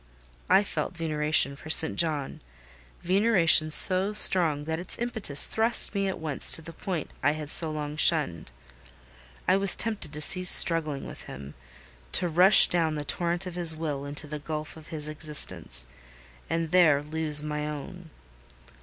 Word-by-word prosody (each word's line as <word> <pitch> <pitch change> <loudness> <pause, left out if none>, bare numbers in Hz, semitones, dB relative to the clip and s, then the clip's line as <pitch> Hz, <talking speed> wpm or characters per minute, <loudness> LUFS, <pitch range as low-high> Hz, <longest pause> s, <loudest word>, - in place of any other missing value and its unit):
I 200 - +3
felt 195 -2 -7
veneration 150 -3 -1
for 155 - -14
St. 160 0 +1
John—veneration 155 - -1
so 185 +5 +7
strong 165 -8 +4
that 160 +1 -5
its 180 - -9
impetus 220 -12 +4
thrust 225 0 0
me 200 -1 -3
at 190 - -6
once 155 -4 -1
to 165 - -4
the 165 - -12
point 170 -2 -7
I 145 +2 0
had 155 -1 -8
so 165 - +3
long 150 -1 -7
shunned. 145 - 0 1.0
I 185 - +2
was 195 0 +3
tempted 215 -9 -4
to 150 - -7
cease 180 +4 +1
struggling 155 -5 +4
with - - -12
him—to 60 - -7
rush 180 +5 +4
down 165 -3 -3
the 150 -1 -7
torrent 175 +4 -3
of 180 - -9
his 170 -2 -3
will 150 -3 -7
into 145 +2 -4
the 150 0 -9
gulf 155 0 -8
of 160 -1 -16
his 150 -2 -9
existence, 150 - -5 0.6
and 165 -1 -4
there 155 -6 +2
lose 150 -1 -2
my 150 0 -6
own. 160 +4 -10
155 Hz, 155 wpm, -24 LUFS, 145-175 Hz, 1.0 s, so